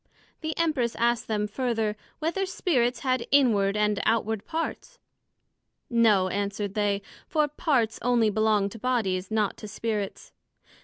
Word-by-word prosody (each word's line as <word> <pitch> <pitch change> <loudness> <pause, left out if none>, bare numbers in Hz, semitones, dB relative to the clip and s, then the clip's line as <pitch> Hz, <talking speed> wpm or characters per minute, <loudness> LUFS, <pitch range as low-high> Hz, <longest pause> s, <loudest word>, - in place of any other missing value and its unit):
The 315 -1 -4
Empress 300 -8 +1
asked 235 0 +1
them 210 -1 0
further, 225 -1 -1 0.2
Whether 340 +5 -1
Spirits 255 -10 0
had 255 -3 0
inward 210 -8 +4
and 210 -1 +1
outward 220 -2 0
parts? 330 +9 -4 0.9
No, 220 -5 +4
answered 200 0 -2
they; 205 -1 0 0.2
for 305 -1 +2
parts 275 -6 0
onely 235 -3 +3
belong 215 -1 +2
to 225 - -10
bodies, 200 -7 0
not 215 -2 0
to 215 - -8
Spirits. 210 -1 -4
225 Hz, 135 wpm, -27 LUFS, 210-255 Hz, 0.9 s, inward